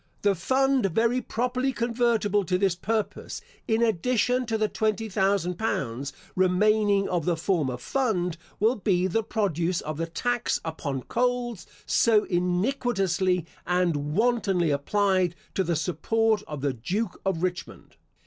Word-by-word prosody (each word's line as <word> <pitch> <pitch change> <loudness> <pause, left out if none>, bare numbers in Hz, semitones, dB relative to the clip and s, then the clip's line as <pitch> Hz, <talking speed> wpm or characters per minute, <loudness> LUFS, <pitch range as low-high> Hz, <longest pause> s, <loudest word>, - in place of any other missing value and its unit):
The 205 -1 +4
fund 260 +5 +2
very 230 +7 +1
properly 250 +3 -1
convertible 230 -4 +1
to 180 +1 +1
this 190 -1 +2
purpose, 215 +4 -3 0.3
in 225 0 +2
addition 245 +4 +1
to 225 -1 0
the 215 0 +1
twenty 220 +1 -1
thousand 190 -2 0
pounds, 135 - -2 0.2
remaining 200 +2 +3
of 175 -4 -1
the 175 -2 +1
former 160 -7 0
fund, 180 - -1 0.2
will 225 +4 +3
be 185 -3 +1
the 190 +5 +1
produce 185 -6 -1
of 155 -1 -5
the 165 +1 -2
tax 240 +8 -1
upon 140 -5 -4
coals, 245 -6 -1 0.2
so 220 -3 +4
iniquitously 185 - 0 0.2
and 165 -5 0
wantonly 200 -7 +2
applied 185 +4 +1 0.2
to 190 - +1
the 170 -2 0
support 215 +7 +1
of 150 -3 -6
the 140 -1 0
Duke 180 - -3
of 185 -3 -1
Richmond. 180 -1 -4
195 Hz, 140 wpm, -26 LUFS, 175-225 Hz, 0.3 s, The